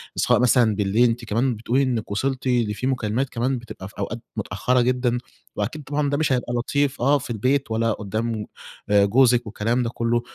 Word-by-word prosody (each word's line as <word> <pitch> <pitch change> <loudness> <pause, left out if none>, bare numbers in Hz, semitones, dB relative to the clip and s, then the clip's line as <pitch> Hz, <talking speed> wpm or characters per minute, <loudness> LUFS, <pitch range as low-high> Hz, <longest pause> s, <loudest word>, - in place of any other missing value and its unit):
سواء - - +3
مثلًا 120 -3 +4
بالليل، 105 +4 +3
أنتِ 115 +1 -3
كمان 120 +4 +1
بتقولي 120 +5 0
إنِّك 120 -6 -2
وصلتِ 130 +5 -1
لفي 120 -1 0
مكالمات 125 0 -1
كمان 130 +2 -1
بتبقى 115 -5 -9
في - - -21
أوقات 105 +3 -3 0.2
متأخرة 110 +4 0
جدًا، 125 0 +1 0.4
وأكيد 125 +9 -3
طبعًا 145 +1 -1
ده 145 - 0
مش 155 -2 +1
هيبقى 125 -1 -1
لطيف 140 +3 0
آه 140 +4 +4
في 130 - -8
البيت 125 +3 0
ولا 115 +1 +1
قدّام 110 +1 -3 0.4
آآ 100 -1 +5
جوزِك 120 +3 +4
والكلام 115 +3 -1
ده 115 - -1
كُلّه، 120 0 0
120 Hz, 185 wpm, -23 LUFS, 110-130 Hz, 0.4 s, آآ